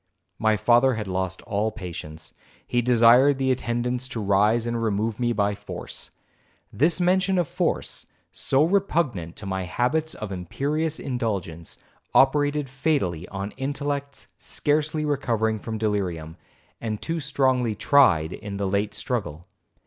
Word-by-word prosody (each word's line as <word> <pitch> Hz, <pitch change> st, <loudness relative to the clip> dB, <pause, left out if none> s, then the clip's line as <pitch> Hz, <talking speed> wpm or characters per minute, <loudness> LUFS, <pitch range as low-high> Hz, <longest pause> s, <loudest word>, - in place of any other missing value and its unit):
My 110 Hz, -1 st, +3 dB
father 120 Hz, +4 st, +4 dB
had 105 Hz, -2 st, -4 dB
lost 95 Hz, 0 st, -3 dB
all 105 Hz, +2 st, -1 dB
patience; 80 Hz, -6 st, -8 dB, 0.3 s
he 120 Hz, -, +1 dB
desired 125 Hz, +3 st, +5 dB
the 130 Hz, -1 st, +1 dB
attendants 125 Hz, 0 st, -1 dB
to 125 Hz, -3 st, -5 dB
raise 105 Hz, +3 st, +2 dB
and 120 Hz, 0 st, -2 dB
remove 110 Hz, 0 st, -1 dB
me 120 Hz, -1 st, +1 dB
by 105 Hz, -2 st, +1 dB
force. -, -, -5 dB, 0.6 s
This 155 Hz, -, +3 dB
mention 185 Hz, +1 st, +2 dB
of 175 Hz, -3 st, +1 dB
force, -, -, -2 dB, 0.2 s
so 135 Hz, +2 st, +2 dB
repugnant 160 Hz, -, 0 dB
to 105 Hz, -, -9 dB
my 95 Hz, -1 st, -2 dB
habits 155 Hz, -, 0 dB
of 105 Hz, -2 st, -6 dB
imperious 145 Hz, -, -2 dB
indulgence, 100 Hz, -10 st, -4 dB, 0.4 s
operated 145 Hz, +1 st, +3 dB
fatally 130 Hz, -, -1 dB
on 100 Hz, +1 st, -5 dB
intellects 140 Hz, 0 st, -4 dB
scarcely 150 Hz, +1 st, 0 dB
recovering 115 Hz, -7 st, 0 dB
from 110 Hz, 0 st, -5 dB
delirium, 90 Hz, -7 st, -2 dB, 0.5 s
and 110 Hz, -2 st, -3 dB
too 165 Hz, 0 st, -3 dB
strongly 130 Hz, -5 st, +1 dB
tried 95 Hz, -, +4 dB
in 100 Hz, -2 st, -6 dB
the 100 Hz, -1 st, -1 dB
late 100 Hz, +2 st, -1 dB
struggle. 105 Hz, -, -3 dB
120 Hz, 135 wpm, -25 LUFS, 100-140 Hz, 0.6 s, desired